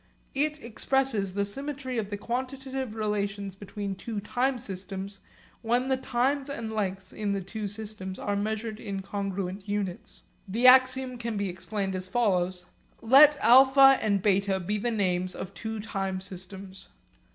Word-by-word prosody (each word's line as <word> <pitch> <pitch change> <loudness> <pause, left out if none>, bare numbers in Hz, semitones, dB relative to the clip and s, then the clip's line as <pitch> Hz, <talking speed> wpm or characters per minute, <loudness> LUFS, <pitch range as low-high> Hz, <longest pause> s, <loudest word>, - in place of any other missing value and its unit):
It 300 +2 0
expresses 230 -4 0
the 200 0 +1
symmetry 265 +2 -4
of 205 -2 -4
the 205 - -4
quantitative 260 +1 -4
relations 205 -2 -2
between 200 0 -5
two 205 +3 -5
time 250 +6 0
systems 195 -2 -6 0.4
when 245 +3 +1
the 265 - +3
times 265 +3 0
and 230 -5 -4
lengths 195 -3 -3
in 205 -2 -2
the 200 - -2
two 210 +2 -5
systems 205 -2 -5
are 205 - -2
measured 215 +1 -3
in 195 -3 -5
congruent 195 0 -4
units. 200 -3 -4 0.2
The 225 +6 0
axiom 255 0 +6
can 230 -2 -3
be 200 -1 -1
explained 190 +2 -3
as 185 0 -3
follows: 185 -5 +1 0.4
Let 285 +5 +7
α 270 +2 +7
and 200 -3 +1
β 195 -2 +1
be 210 +3 -1
the 240 - -1
names 185 -4 0
of 185 - -6
two 220 -1 -5
time 195 -3 -3
systems. 190 0 -8
210 Hz, 150 wpm, -28 LUFS, 195-245 Hz, 0.4 s, Let